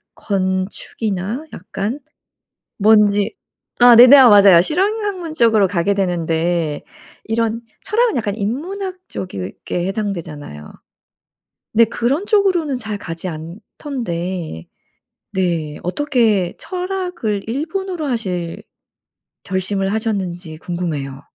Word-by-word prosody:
건축이나 195 - -2
약간 205 - -4 0.8
뭔지 210 - +4 0.4
아 245 -1 +8
네네 250 +3 +10
아 260 -3 +8
맞아요. 200 -4 +8
실용 395 - 0
학문 365 -6 -4
쪽으로 225 -7 +4
가게 185 +1 +1
되는데 170 -4 -1 0.4
이런 230 0 -1 0.2
철학은 460 -2 +1
약간 210 -4 -1
인문학 355 - -3
쪽에 175 - -5
해당되잖아요. 170 - -5 1.0
네. 230 +1 +6
그런 245 - -1
쪽으로는 370 - +2
잘 220 -4 -4
가지 170 -1 -5
않던데 175 - -5 0.7
네. 170 -6 -1
어떻게 215 - +1
철학을 360 - -3
일본어로 325 +5 -3
하실 185 -10 -3 0.8
결심을 195 +1 -1
하셨는지 190 -7 -3
궁금해요. 155 -6 -4
205 Hz, 230 characters per minute, -19 LUFS, 175-265 Hz, 1.0 s, 네네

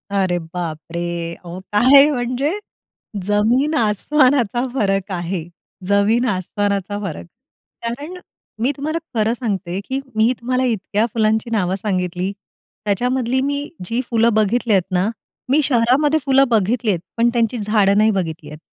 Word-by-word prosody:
अरे 185 -3 +1
बापरे! 170 0 -5
अहो, 175 +1 -7
काय 265 +7 +7
म्हणजे? 255 +2 -1 0.8
जमीन-आसमानाचा 245 +2 +2
फरक 195 -5 0
आहे. 175 -1 -3 0.4
जमीन 205 +5 +3
आसमानाचा 200 +1 -2
फरक. 155 - -5 0.6
कारण 290 +10 -5 0.4
मी 250 +4 +2
तुम्हाला 310 +3 -2 0.2
खरं 220 +1 +2
सांगते, 195 -7 -3
की 265 +1 -2 0.2
मी 220 +2 +4
तुम्हाला 255 +2 0
इतक्या 215 -2 0
फुलांची 220 0 +1
नावं 190 -4 +1
सांगितली. 185 -2 -2 0.5
त्याच्यामधली 250 +4 0
मी 285 +1 -2 0.2
जी 230 +7 -1
फुलं 230 0 +3
बघितली 220 +2 +2
आहेत 190 -2 +4
ना, 185 +3 +1 0.4
मी 290 +4 +4
शहरामध्ये 270 +4 +3
फुलं 270 0 +5
बघितली 225 +1 +1
आहेत 180 - -1 0.2
पण 235 +1 +4
त्यांची 235 0 +1
झाडं 205 -2 +3
नाही 215 +1 +4
बघितली 165 -6 -3
आहेत. 150 0 -10
220 Hz, 130 wpm, -19 LUFS, 190-250 Hz, 0.8 s, काय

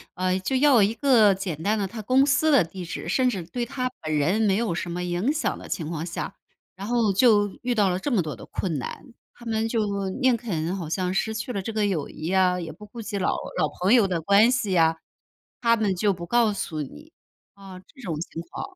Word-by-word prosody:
呃， 185 0 0
就 260 +8 -2
要 265 -4 +5
一 210 +3 +2
个 230 -8 +5
简 180 -5 -5
单 210 +5 +1
的 205 - -1
他 220 +3 -7
公 255 +5 +3
司 300 +2 +2
的 270 - +6
地 180 +3 -8
址， 170 - -6
甚 255 -1 +2
至 190 -7 -3
对 240 +9 -4
他 255 0 -2
本 155 -1 -2
人 180 +10 +2
没 200 -3 +3
有 225 -5 0
什 175 +1 -4
么 180 +1 -3
影 180 +9 0
响 310 0 -2
的 - - -10
情 160 -5 -3
况 165 -2 -3
下， 170 0 -5 0.4
然 195 +3 -7
后 230 -4 +2
就 205 -1 +4
遇 245 -1 -1
到 205 -3 +3
了 180 0 -1
这 270 +9 -3
么 220 - +2
多 155 -2 -5
的 - - -12
困 165 -7 -3
难。 235 - -8 0.2
他 240 - -15
们 225 -1 0
就 200 -4 -1
宁 255 -2 +4
肯 180 -7 -3
好 170 -5 -5
像 180 +2 -1
失 220 +3 0
去 220 +3 -4
了 200 - -2
这 205 - -5
个 215 -1 0
友 170 -8 -1
谊 155 - -8
呀， 185 0 +2
也 165 -2 -5
不 200 +7 -12
顾 230 +3 -11
及 210 -1 -4
老 - - +1 0.3
老 155 -3 +2
朋 185 +5 +3
友 230 -6 +5
的 180 -3 -1
关 200 +8 +5
系 250 -6 0
呀。 165 -2 +3 0.6
他 230 -1 +4
们 210 -4 0
就 205 +3 +2
不 170 -1 -7
告 235 +2 +3
诉 160 -6 -4
你， 300 - -10 0.4
啊， 195 -2 -12
这 200 +9 -18
种 175 -9 -3
情 165 0 -6
况。 385 - -7
200 Hz, 260 characters per minute, -25 LUFS, 180-230 Hz, 0.6 s, 的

